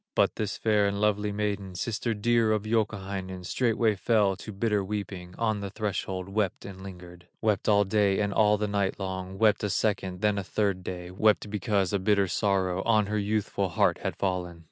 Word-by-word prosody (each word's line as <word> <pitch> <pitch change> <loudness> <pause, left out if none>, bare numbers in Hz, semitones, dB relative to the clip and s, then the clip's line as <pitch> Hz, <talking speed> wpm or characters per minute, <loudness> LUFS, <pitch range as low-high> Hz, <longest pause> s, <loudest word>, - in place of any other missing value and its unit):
But - - +3
the 110 - -2
fair 105 0 +1
and 100 0 -2
lovely 105 0 +1
maiden, 100 -2 -3
Sister 115 +3 -2
dear 115 +1 +2
of 105 -1 -1
Youkahainen, 100 -4 -2
Straightway 115 0 +1
fell 100 0 +2
to 110 - -8
bitter 105 0 0
weeping, 95 -3 -5
On 110 -2 0
the 100 -1 -4
threshold 95 -2 -3
wept 100 -1 -1
and 95 -1 -9
lingered, 90 -2 -11
Wept 105 -2 +1
all 105 -1 +5
day 100 -1 +2
and 100 -1 0
all 105 0 +4
the 105 +1 -1
night 100 -1 -1
long, 95 0 -4
Wept 105 0 +3
a 105 - 0
second, 95 -2 -1
then 105 -1 +2
a - - -3
third 95 -1 -1
day, 90 -1 -6
Wept 105 +2 +2
because 100 -2 0
a 100 - +2
bitter 100 0 +2
sorrow 95 -1 0
On 110 -1 +3
her 105 +1 -1
youthful 100 -1 -1
heart 80 - +2
had - - -3
fallen. 90 -3 -2
100 Hz, 190 wpm, -28 LUFS, 95-105 Hz, -, all